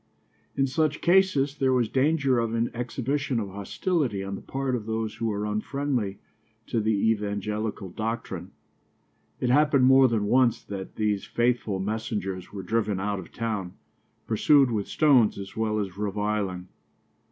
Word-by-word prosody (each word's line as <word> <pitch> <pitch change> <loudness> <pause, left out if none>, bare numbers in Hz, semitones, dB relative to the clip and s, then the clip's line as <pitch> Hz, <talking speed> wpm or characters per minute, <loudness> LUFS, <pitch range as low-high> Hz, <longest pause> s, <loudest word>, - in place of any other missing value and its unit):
In 135 - +3
such 155 +2 0
cases 170 -7 +3
there 130 -2 +2
was 125 -3 +2
danger 135 0 +2
of 115 -1 -1
an 115 +1 0
exhibition 130 +2 -2
of 100 -3 -4
hostility 105 - -1
on 100 0 -5
the 95 - -6
part 135 -1 -2
of 110 -3 -5
those 110 -1 -2
who 115 - -3
were 105 -1 -2
unfriendly 105 0 -2 0.5
to 115 - -1
the 110 - 0 0.2
evangelical 105 -1 -3
doctrine. 105 -4 -4 0.9
It 125 - +1
happened 145 -1 +4
more 130 0 +7
than 110 -4 0
once 125 +1 +3
that 95 -2 -7
these 105 -2 0
faithful 120 -4 0
messengers 95 -3 -3
were 100 -2 -6
driven 105 0 0
out 100 0 -2
of 90 - -10
town, 105 -6 -3 0.5
pursued 135 +4 +4
with 105 -3 -1
stones 135 -8 +4
as 100 -1 -8
well 110 -1 0
as 100 -4 -3
reviling. 105 -2 -2
110 Hz, 150 wpm, -26 LUFS, 100-130 Hz, 0.9 s, more